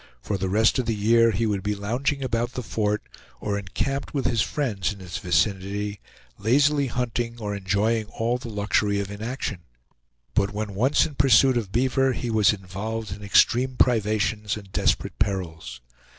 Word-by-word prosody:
For 100 +11 -3
the 95 0 -2
rest 110 +6 +3
of 125 - -1
the 115 - +1
year 115 +3 +4
he 115 +1 0
would 105 -3 0
be 105 +2 -1
lounging 130 +8 -1
about 120 -1 -1
the 125 - -4
fort, 105 -1 -1 0.4
or 105 +6 -2
encamped 135 - -3
with 135 - -1
his 115 -4 +2
friends 110 - -1
in 100 - -9
its 90 0 -6
vicinity, 100 +4 0 0.4
lazily 140 +6 +3
hunting 120 -1 -2
or 105 -3 -4
enjoying 105 +3 0
all 115 +3 -1
the 120 - -7
luxury 105 -1 +1
of 100 0 -4
inaction; 110 -1 -4 0.7
but 100 0 +1
when 105 -1 -3
once 125 +9 +3
in 160 - -6
pursuit 135 -1 +5
of 110 -5 -2
beaver, 130 +3 +2
he 120 -1 -3
was 110 -3 +4
involved 105 +2 -5
in 100 +2 -7
extreme 120 +5 +3
privations 110 -3 +1
and 100 -2 -12
desperate - - 0
perils. 80 - -3
110 Hz, 170 wpm, -25 LUFS, 100-120 Hz, 0.7 s, pursuit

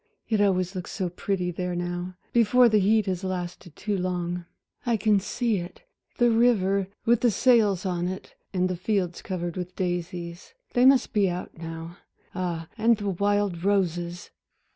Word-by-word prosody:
It 215 -3 +1
always 185 -2 +2
looks 180 -2 -5
so 185 -3 -2
pretty 180 0 -2
there 180 +1 -3
now, 175 +1 -3 0.2
before 240 +2 +5
the 215 -2 +4
heat 215 +2 +3
has 185 -1 -2
lasted 180 -2 -5
too 210 -1 -2
long. 180 -1 -2 0.4
I 235 -2 +1
can 210 -1 +3
see 225 +2 -1
it 175 - -7 0.3
the 240 -2 +4
river 200 -5 +3 0.2
with 235 0 +4
the 245 - +4
sails 210 -5 +3
on 175 -1 -1
it, 185 +1 -6 0.2
and 185 -1 +1
the 185 - -2
fields 180 -1 -1
covered 175 -2 -4
with 180 -1 -5
daisies 175 - -4 0.2
they 245 +1 +5
must 270 -1 +4
be 200 -3 +3
out 175 +1 -5
now 165 +1 -7 0.4
ah, 175 -3 -3
and 230 +1 +4
the 205 -1 -2
wild 200 -2 0
roses!" 175 -3 0
185 Hz, 165 wpm, -26 LUFS, 175-210 Hz, 0.4 s, before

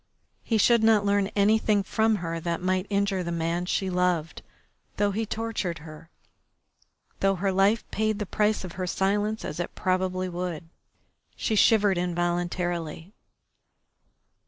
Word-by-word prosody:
He 225 - 0
should 235 +1 +4
not 220 -2 +4
learn 200 -1 +2
anything 210 0 +3
from 220 +3 +1
her 165 0 -3
that 170 0 -2
might 185 +1 -1
injure 200 -2 0
the 170 -1 -3
man 170 +1 -1
she 190 - 0
loved, 180 -3 0 0.6
though 205 0 +2
he 220 +2 -2
tortured 215 -7 -3
her, 155 +1 -12 1.1
though 195 0 +2
her 195 +2 0
life 195 +4 +3
paid 215 0 0
the 210 - -3
price 210 +2 0
of 185 - -6
her 185 +1 -4
silence, 205 +4 0
as 150 - -5
it 175 - -4
probably 185 -1 0
would. 175 -2 -5 0.7
She 220 - -2
shivered 205 -3 +4
involuntarily. 175 0 -2
185 Hz, 140 wpm, -26 LUFS, 175-210 Hz, 1.1 s, should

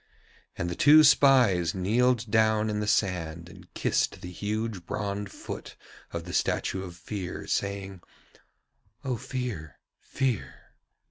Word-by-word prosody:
And 85 - -2
the 85 - -2
two 150 - +7
spies 120 - +5
kneeled 115 +4 +1
down 110 0 +3
in 105 - -2
the 105 - -2
sand 85 -5 0
and 90 - -15
kissed - - 0
the 90 - -7
huge 105 0 -3
bronze 100 -1 -3
foot - - -8 0.4
of 85 -1 -4
the 90 +1 -8
statue 95 - 0
of 90 -2 -8
Fear, 90 +1 -6
saying: 100 -2 -3 1.0
'O 130 -2 0
Fear, 110 - -5 0.2
Fear.' 130 -6 -2
100 Hz, 130 wpm, -27 LUFS, 90-115 Hz, 1.0 s, two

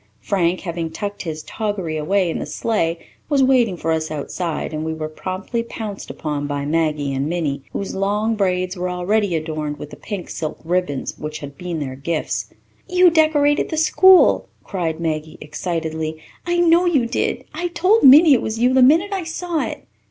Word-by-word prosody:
Frank, 185 -2 0
having 170 -2 -4
tucked 205 +5 -5
his 155 -3 -5
toggery 205 -7 -3
away 180 +5 +1
in - - -3
the - - -5
sleigh, 170 -7 -1 0.3
was 280 -3 +3
waiting 245 -8 +3
for 165 0 -2
us 160 0 -1
outside, 155 +2 -4
and 155 0 -3
we 160 0 -3
were 155 -1 -4
promptly 185 +8 -4
pounced 220 -3 -7
upon 145 -2 -3
by 145 -1 -3
Maggie 150 -2 0
and 135 +2 -1
Minnie, 155 -5 -2
whose 195 - -4
long 205 +3 0
braids 185 -2 0
were 180 0 -3
already 180 +1 0
adorned 155 -2 -3
with 150 - -9
the - - -8
pink 200 -5 -6
silk 155 -2 -4
ribbons 170 -5 -2
which 155 0 -5
had 145 -2 -9
been 175 0 -5
their 135 -3 -4
gifts. 155 +4 -3 0.4
"You 360 -1 +5
decorated 310 -2 +3
the 315 - -3
school," 375 +4 +5
cried 165 -4 -3
Maggie 155 -1 -3
excitedly. 160 0 -4 0.3
"I 350 0 +1
know 345 +1 +4
you 285 -9 +2
did. 235 - -1
I 350 - -2
told 365 +6 +2
Minnie 290 +3 +8
it 240 - +3
was 220 +1 -3
you 250 +2 +3
the 260 - +5
minute 330 +10 +4
I 380 -2 -2
saw 330 0 -2
it." - - -8
180 Hz, 185 wpm, -20 LUFS, 155-250 Hz, 0.4 s, Minnie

